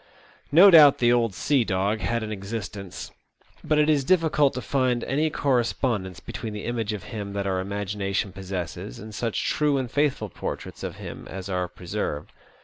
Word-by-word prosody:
No 180 +6 +8
doubt 150 -4 +9
the 120 0 +4
old 115 -5 +1
sea 135 -3 +2
dog 100 +2 0
had 115 +1 -1
an 110 - -5
existence; 100 -2 -6 0.5
but 155 - +1
it 150 0 +4
is 150 -3 +3
difficult 155 -3 +3
to 130 - -3
find 130 -3 +1
any 150 +4 +1
correspondence 120 - 0
between 110 -2 -6
the 105 - -6
image 115 -2 -2
of 105 -2 -5
him 100 -2 -6
that 100 -1 -2
our 95 -1 0
imagination 100 +1 -2
possesses 90 -9 -5
and 110 +1 -9
such 115 0 -2
true 150 -2 +2
and 130 -3 -3
faithful 140 -7 0
portraits - - -6
of - - -5
him - - -8
as 95 0 -7
are 90 -1 -1
preserved. 75 -3 -4
110 Hz, 175 wpm, -25 LUFS, 100-135 Hz, 0.5 s, doubt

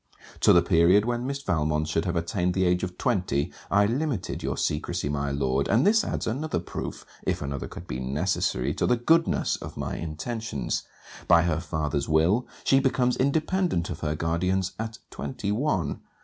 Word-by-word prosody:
To - - +6
the 85 - +6
period 90 +4 +4
when 120 +1 -1
Miss 140 0 -4
Valmont 75 - 0
should 80 +1 0
have 90 -1 -1
attained 90 +1 0
the 95 -1 +2
age 90 0 +2
of 90 -1 -4
twenty, 90 - 0 0.2
I 100 +1 +4
limited 125 - -2
your - - -2
secresy, 75 -1 -1
my 70 -1 -1
Lord; 70 -1 0
and 115 +7 +3
this 220 +1 +5
adds - - -2
another 140 - -1
proof, 85 - -5 0.2
if - - -1
another 70 0 -4
could - - -9
be 65 - -4
necessary, 70 -1 0
to - - 0
the 125 - +3
goodness 165 +8 +2
of - - -9
my - - -3
intentions. 85 - -3 0.4
By 85 0 +6
her 85 -2 +1
father's 75 -3 -2
will, 85 +10 +3 0.2
she 135 - +4
becomes 125 -2 +2
independent 155 - +1
of 80 - -5
her 75 -1 -1
guardians 90 +4 0
at 110 0 -4
twenty 105 -6 -4
one. 105 - 0
90 Hz, 175 wpm, -26 LUFS, 75-120 Hz, 0.4 s, To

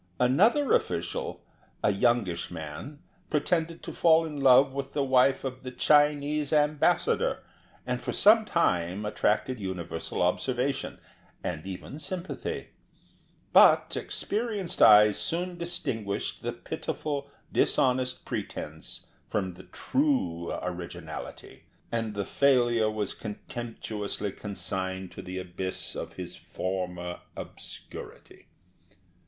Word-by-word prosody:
Another 210 - +4
official, 85 +1 -1 0.4
a - - +4
youngish 100 -5 +1
man, 85 - -7 0.3
pretended 165 +2 0
to - - -6
fall 165 0 +5
in 150 -3 -5
love 135 0 +6
with 135 0 -4
the 145 - +1
wife 130 0 +4
of 130 -1 -4
the 130 - -6
Chinese 145 +2 +3
Ambassador, 150 -1 +2 0.4
and 125 0 -2
for - - -3
some 220 +3 +6
time 95 - +1
attracted 110 +4 0
universal 90 -3 -3
observation, 130 +9 0 0.5
and 80 +4 -4
even 95 +10 -7
sympathy. 175 +4 -4 0.8
But - - +6
experienced 205 -5 -2
eyes 105 -1 +8
soon 175 +2 -1
distinguished 115 -12 -2
the - - -2
pitiful, 145 -2 -4 0.2
dishonest 125 -1 +2
pretence 80 +1 -5 0.2
from 95 -3 -1
the 90 +1 -13
true 255 - 0
originality, 90 -1 -7 0.3
and 115 -2 -2
the 100 -1 -2
failure 120 -5 +3
was 105 -2 -2
contemptuously 105 -2 -5
consigned 95 -1 -3
to - - -8
the 90 0 -6
abyss 95 0 -4
of - - -5
his - - -7
former 90 -1 -4 0.2
obscurity. - - -9
125 Hz, 110 wpm, -28 LUFS, 95-145 Hz, 0.8 s, eyes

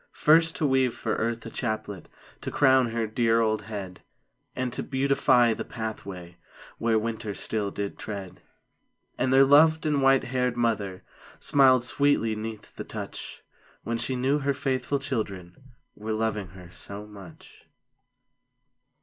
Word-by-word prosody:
First 160 +1 +4
to 155 - -1
weave 130 -3 +2
for 110 - -2
Earth 115 0 -2
a 115 - -7
chaplet 110 -5 -4 0.3
To - - -4
crown 130 -2 +4
her 115 0 -1
dear 115 +1 +2
old 110 -1 +1
head; 100 -4 -7 0.5
And 125 -1 -2
to - - -3
beautify 130 -3 +3
the - - -5
pathway 100 -6 -7 0.4
Where 115 -1 +2
winter 110 -2 -3
still 105 -2 -2
did 100 0 -5
tread. 100 -4 -7 0.8
And 130 - +1
their 135 +1 +7
loved 155 +3 +5
and 150 -2 +1
white 135 0 +4
haired 125 -1 -1
mother 105 -6 -1 0.4
Smiled 130 -3 +4
sweetly 125 -4 +1
'neath 110 0 -7
the - - -5
touch, - - -8 0.4
When 115 0 -2
she 125 +3 0
knew 135 +4 +1
her 140 -1 0
faithful 135 +1 -1
children 105 -10 -4 0.4
Were 110 +1 -4
loving 110 -3 -1
her 90 -1 -12
so 100 +3 -8
much. 100 -6 -14
115 Hz, 145 wpm, -26 LUFS, 105-130 Hz, 0.8 s, their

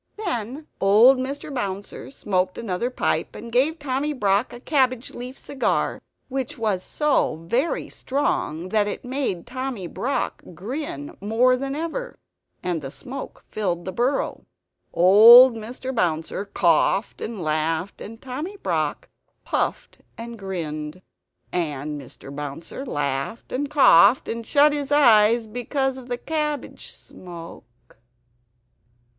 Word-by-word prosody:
Then 295 - -4
old 220 +7 +6
Mr. 275 +3 -4
Bouncer 200 -5 -4
smoked 185 -8 -1
another 230 +2 -2
pipe, 255 - -1
and 235 - -8
gave 275 +7 +2
Tommy 290 0 -2
Brock 205 -2 +1
a 240 - -9
cabbage 255 -3 +1
leaf 250 +2 -8
cigar 275 - -1 0.3
which 265 -2 -4
was 210 -5 0
so 295 - +1
very 255 - 0
strong 185 - -2
that 210 0 +2
it 205 - -5
made 250 -9 -2
Tommy 255 -6 -4
Brock 255 +10 -2
grin 205 - -5
more 230 +5 +3
than 270 +2 -3
ever; 335 +11 -4 0.5
and 175 -3 -1
the 135 - -6
smoke 260 - -8
filled 175 -5 -2
the 185 - -3
burrow. 245 +8 -1 0.4
Old 225 +8 +9
Mr. 245 +4 -6
Bouncer 170 -2 -1
coughed 180 +1 +1
and 220 -2 -5
laughed; 160 +3 -1
and 225 +2 -9
Tommy 295 +11 -6
Brock - - -2 0.4
puffed - - -2 0.2
and 230 0 -8
grinned. 165 -3 -5 0.5
And 150 -3 -2
Mr. 135 +1 -12
Bouncer 150 - -6
laughed 140 - -3
and 280 +3 -2
coughed, 260 - +6
and 230 0 -4
shut 290 +1 +5
his 290 -1 -3
eyes 230 -5 +5
because 260 +4 -2
of 250 - -12
the 245 -1 -2
cabbage 300 0 -3
smoke 165 -11 -13
230 Hz, 125 wpm, -23 LUFS, 180-265 Hz, 0.5 s, Old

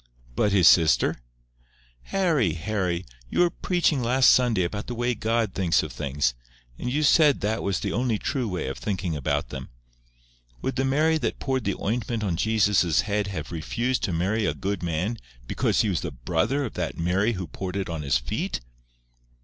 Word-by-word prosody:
"But 105 - +2
his 95 -4 +5
sister?" 80 -3 +5 0.9
"Harry, 160 - +1
Harry! 90 0 -2 0.2
You - - +1
were 175 -1 +4
preaching 170 -6 +1
last 125 +2 +5
Sunday 120 -7 +3
about 105 +4 -4
the 120 - -4
way 120 +1 0
God 115 -1 0
thinks 90 -5 +2
of - - -6
things. 70 -2 -1 0.5
And 125 - -3
you 150 +3 +1
said 150 -1 +5
that 110 +3 -1
was 100 -3 -1
the - - -2
only 120 -2 0
true 130 +2 -2
way 90 -8 -3
of 65 - -5
thinking 95 -5 -2
about 70 -4 -1
them. 65 -1 -7 0.9
Would 130 - -2
the 135 +1 0
Mary 155 +4 +2
that - - -2
poured 130 -3 -2
the 100 - 0
ointment 115 +1 -2
on 95 -5 0
Jesus's 105 -4 +3
head 105 -1 -1
have 85 -6 -5
refused 120 +10 -1
to - - -2
marry 95 +6 0
a - - -1
good 100 -1 -3
man 90 +7 -2 0.3
because - - +1
he 110 - +1
was 90 - -1
the 85 - -3
brother 85 - -1
of 115 - -6
that - - -3
Mary 95 +7 +1
who 95 -3 -4
poured 95 +2 -6
it 100 -1 -2
on 80 -3 -4
His 70 -2 +2
feet? - - -3
105 Hz, 190 wpm, -25 LUFS, 85-120 Hz, 0.9 s, his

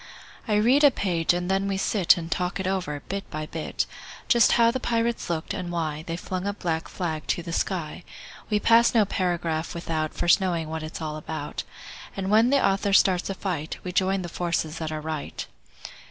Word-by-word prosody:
I 210 - +2
read 245 +8 +4
a 290 - +9
page, 175 -9 +1
and 175 0 -1
then 195 +1 +1
we 195 -1 -1
sit 195 -2 +3
And 165 -1 -6
talk 180 +2 -1
it 190 - -2
over, 180 -7 -2
bit 200 +1 -4
by 155 0 -4
bit; 160 0 -3 0.4
Just 235 -2 +5
how 230 -1 +5
the 260 - -2
pirates 230 -4 -1
looked, 160 -2 -2
and 180 -3 -4
why 155 -3 -2
They 165 0 -3
flung 185 +2 -4
a 200 - 0
black 165 -5 -2
flag 160 -4 -4
to 175 - 0
the 170 -1 -5
sky. 175 -2 -2 0.5
We 210 -1 +2
pass 230 +2 +5
no 220 -2 +5
paragraph 170 -4 -1
without 160 -2 -2
First 175 +3 +4
knowing 170 -4 -1
what 160 0 -3
it's 155 +1 -6
all 155 -1 -3
about, 155 -1 -5 0.6
And 195 0 -2
when 225 +3 +5
the 280 0 +4
author 195 +1 +1
starts 185 -2 +4
a 195 - -2
fight 170 -6 -3
We 180 - -4
join 190 +1 +1
the - - -4
forces 170 -2 -2
that 160 -1 -3
are 155 -1 -3
right. 155 -1 -4
180 Hz, 205 wpm, -26 LUFS, 160-200 Hz, 0.6 s, a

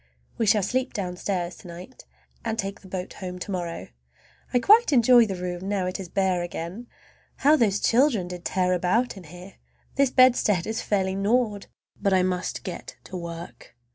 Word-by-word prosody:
We 225 - +1
shall 210 -1 +4
sleep 255 +6 -1
downstairs 180 -2 -3
to - - -13
night, 175 +9 -11 0.4
and 225 -1 -2
take 195 -2 -4
the 195 - -14
boat 185 -1 -5
home 180 -2 -7
to 180 - -6
morrow. 175 -3 -4 0.6
I - - +3
quite 425 - +5
enjoy 240 -2 +6
the 195 - -3
room, 180 +1 -5
now 200 -3 0
it 185 +1 -3
is 185 -3 -7
bare 190 -1 +1
again. 175 +6 -6 0.5
How 295 +3 +4
those 210 -8 +2
children 235 -6 +2
did 180 -1 -8
tear 185 -1 +1
about 185 +8 +1
here! 180 +1 -12 0.4
This 275 -1 +4
bedstead 245 -8 +4
is 220 +1 -3
fairly 190 -2 0
gnawed! 205 +1 0 0.3
But 200 - +2
I 185 -1 +4
must 180 -1 -2
get 180 -2 -7
to 185 - -10
work. 170 -6 -8
190 Hz, 175 wpm, -25 LUFS, 180-230 Hz, 0.6 s, enjoy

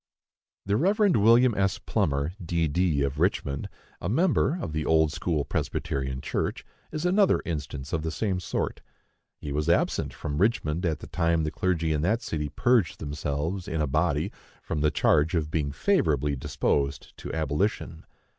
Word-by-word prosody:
The 100 +2 +1
Rev. 200 - +3
William 115 +3 +5
S. 95 -2 +1
Plummer, 70 +3 -1
D.D., 80 -2 +1
of 70 +1 -2
Richmond, 75 -6 0 0.3
a 85 - -2
member 160 - +2
of 80 - -4
the 80 0 -1
Old 80 -1 +3
school 80 -6 -1
Presbyterian 65 -4 -2
Church, - - -2 0.3
is 155 +2 -3
another 195 +2 +4
instance 75 -3 -5
of 80 - 0
the 80 - -2
same 95 +2 -1
sort. 90 - -3 0.6
He 70 - -6
was 75 +3 -1
absent 85 - +1
from 75 0 -4
Richmond 90 -5 +1
at 80 -3 -2
the - - -8
time 85 -1 +1
the 75 - -1
clergy 85 -3 0
in 75 - 0
that 110 +8 +1
city 75 -6 -3
purged 115 - +2
themselves, 75 +5 -3
in 80 -4 -2
a 75 - +2
body, 75 +4 0 0.3
from 75 - -3
the 75 - +4
charge 75 +3 +2
of 80 -2 -1
being 75 -3 -1
favorably 75 - +1
disposed 70 +1 -1
to - - -7
abolition. 80 +6 -1
80 Hz, 165 wpm, -27 LUFS, 75-95 Hz, 0.6 s, William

